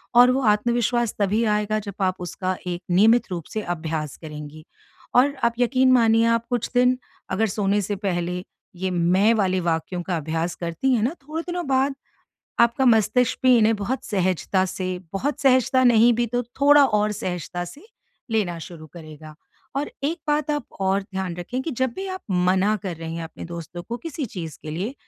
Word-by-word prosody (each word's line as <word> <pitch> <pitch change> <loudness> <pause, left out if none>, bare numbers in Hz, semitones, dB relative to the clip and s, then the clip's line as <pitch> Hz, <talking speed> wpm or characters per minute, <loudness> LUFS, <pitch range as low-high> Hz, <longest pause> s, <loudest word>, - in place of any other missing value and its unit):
और 245 +1 +8
वो 265 +2 +1
आत्मविश्वास 235 +1 0
तभी 205 +3 +2
आएगा 210 +1 0
जब 200 -2 -8
आप 185 -1 +1
उसका 185 +1 -3
एक 175 0 -3
नियमित 215 +4 +4
रूप 170 -3 -4
से 215 - -1
अभ्यास 160 -5 -4
करेंगी। 150 0 -9 0.5
और 275 +3 +5
आप 235 0 +3
यकीन 255 +1 +3
मानिए 230 -2 +4
आप 230 0 +2
कुछ 240 -2 -1
दिन 250 0 +4 0.3
अगर 215 +4 +1
सोने 205 0 0
से 205 +1 -2
पहले 180 -2 -2 0.3
ये 185 +1 -2
मैं 180 +5 +3
वाले 185 -3 +1
वाक्यों 170 +1 -1
का 175 -1 -2
अभ्यास 160 +2 -2
करती 175 +10 -1
हैं 235 - +2
ना 255 +7 +1
थोड़े 310 +3 -4
दिनों 350 0 -3
बाद 270 +1 +2 0.7
आपका 235 +3 +3
मस्तिष्क 235 +1 +3
भी 255 -1 +7
इन्हें 225 0 +4
बहुत 210 +6 -3
सहजता 185 -1 0
से, 185 0 -3
बहुत 285 +9 -2
सहजता 260 -1 +4
नहीं 240 0 +6
भी 240 +1 0
तो 245 +2 -1 0.2
थोड़ा 290 0 +7
और 210 -2 +1
सहजता 180 -3 -4
से 285 - -11 0.5
लेना 195 -6 0
शुरू 165 -1 -10
करेगा। 155 -2 -11 0.4
और 285 +2 -2
एक 325 +5 -1
बात 295 0 +1
आप 295 -4 -2
और 195 +1 +1
ध्यान 190 -3 -5
रखें 180 +9 -4
कि 320 - -3
जब 260 -2 -1
भी 385 - -4
आप 375 0 -5
मना 185 +3 +2
कर 185 -4 -4
रहे 165 0 -6
हैं 165 0 -4
अपने 165 - -9
दोस्तों 170 +1 -7
को 235 - -3
किसी 320 -1 -5
चीज़ 170 -9 -7
के 155 - -6
लिए 190 - -3
210 Hz, 185 wpm, -23 LUFS, 175-245 Hz, 0.7 s, और